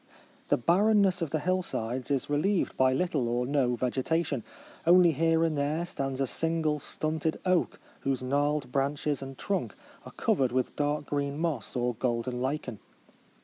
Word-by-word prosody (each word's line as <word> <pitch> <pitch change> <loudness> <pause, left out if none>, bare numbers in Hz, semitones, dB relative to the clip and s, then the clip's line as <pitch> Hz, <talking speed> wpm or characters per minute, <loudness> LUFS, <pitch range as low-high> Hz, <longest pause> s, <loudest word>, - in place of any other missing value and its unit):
The - - +3
barren 205 - +4
' - - +5
ness 185 -2 +1
of 165 - -1
the 155 - 0
hillsides 145 -8 -2
is 140 -3 0
relieved 165 +7 +1
by 130 0 +4
little 140 -3 0
or 120 +1 0
no 130 -3 +1
vegetation. 130 +2 -1 0.4
Only 175 0 +7
here 165 +2 +2
and 160 -2 +1
there 150 +4 0
stands 135 -6 -3
a 135 - +2
single 160 +1 0
stunted 155 +2 -2
oak, 185 -2 +1 0.2
whose 135 -2 -1
gnarled 145 0 0
branches 140 +1 -1
and 135 -1 -8
trunk 185 - -2 0.3
are - - -10
covered 130 -2 +1
with 130 0 -1
dark 145 0 -1
green 140 0 -2
moss 160 -6 -2
or 125 0 0
golden 125 +1 -2
lichen. 130 -4 -3
145 Hz, 165 wpm, -29 LUFS, 130-165 Hz, 0.4 s, Only